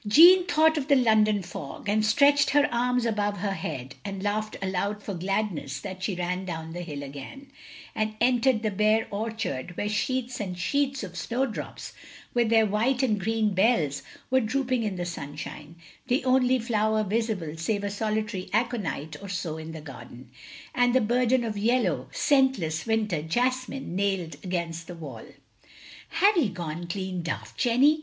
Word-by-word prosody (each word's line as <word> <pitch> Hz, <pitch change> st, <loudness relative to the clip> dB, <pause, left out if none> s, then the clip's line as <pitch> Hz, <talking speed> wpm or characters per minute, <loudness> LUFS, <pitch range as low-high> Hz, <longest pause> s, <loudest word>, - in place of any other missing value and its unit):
Jeanne 350 Hz, -, +8 dB
thought 315 Hz, -1 st, +4 dB
of 270 Hz, -, -5 dB
the 285 Hz, -, +5 dB
London 215 Hz, -5 st, +3 dB
fog, 170 Hz, -1 st, -8 dB
and 215 Hz, +1 st, +2 dB
stretched 285 Hz, +6 st, +4 dB
her 290 Hz, +1 st, +4 dB
arms 250 Hz, 0 st, +1 dB
above 205 Hz, -2 st, 0 dB
her 200 Hz, +1 st, -1 dB
head, 130 Hz, -7 st, -5 dB
and 195 Hz, -1 st, -5 dB
laughed 215 Hz, +1 st, -1 dB
aloud 195 Hz, +2 st, -2 dB
for 200 Hz, -, -4 dB
gladness 180 Hz, -7 st, -2 dB
as 190 Hz, -1 st, -5 dB
she 195 Hz, -, -1 dB
ran 180 Hz, +1 st, -2 dB
down 160 Hz, -3 st, -5 dB
the 175 Hz, -, -5 dB
hill 145 Hz, -5 st, -6 dB
again, 145 Hz, -, -9 dB, 0.4 s
and 215 Hz, 0 st, -1 dB
entered 245 Hz, -1 st, +3 dB
the 215 Hz, -, +1 dB
bare 215 Hz, +3 st, +2 dB
orchard 200 Hz, -, -3 dB
where 205 Hz, -, -1 dB
sheets 250 Hz, +4 st, -1 dB
and 185 Hz, -4 st, -4 dB
sheets 275 Hz, +7 st, 0 dB
of 180 Hz, -3 st, -7 dB
snowdrops, 245 Hz, +9 st, -3 dB, 0.4 s
with 235 Hz, -2 st, +2 dB
their 225 Hz, -1 st, +5 dB
white 235 Hz, +6 st, +1 dB
and 215 Hz, -5 st, +2 dB
green 215 Hz, +1 st, 0 dB
bells, 185 Hz, -, +2 dB, 0.3 s
were 260 Hz, -, +5 dB
drooping 255 Hz, +1 st, 0 dB
in 210 Hz, -4 st, -2 dB
the 175 Hz, -1 st, -3 dB
sunshine, 150 Hz, -1 st, -7 dB, 0.3 s
the 255 Hz, +1 st, +1 dB
only 255 Hz, 0 st, +4 dB
flower 220 Hz, -2 st, +1 dB
visible 205 Hz, -6 st, -1 dB
save 200 Hz, +6 st, -1 dB
a 205 Hz, -, -1 dB
solitary 215 Hz, -2 st, -2 dB
aconite 210 Hz, -, -1 dB
or 200 Hz, -, -8 dB
so 175 Hz, -4 st, -3 dB
in 160 Hz, 0 st, -7 dB
the 160 Hz, -1 st, -7 dB
garden, 125 Hz, -3 st, -11 dB, 0.4 s
and 245 Hz, 0 st, +3 dB
the -, -, +6 dB
burden 245 Hz, +2 st, +2 dB
of 215 Hz, -3 st, -3 dB
yellow, 240 Hz, +4 st, +1 dB
scentless, 260 Hz, -, +2 dB
winter 215 Hz, -8 st, +1 dB
jas 250 Hz, +10 st, 0 dB
mine 270 Hz, -10 st, -6 dB
nailed 195 Hz, -4 st, 0 dB
against 170 Hz, -3 st, -3 dB
the 175 Hz, -, -7 dB
wall. 165 Hz, -2 st, -8 dB, 0.8 s
"Have 405 Hz, +2 st, +4 dB
ye 280 Hz, -11 st, +3 dB
gone 175 Hz, -2 st, -5 dB
clean 185 Hz, 0 st, -3 dB
daft, 170 Hz, -1 st, -5 dB
Jenny?" 270 Hz, +5 st, +4 dB
210 Hz, 170 wpm, -27 LUFS, 175-245 Hz, 0.8 s, Jeanne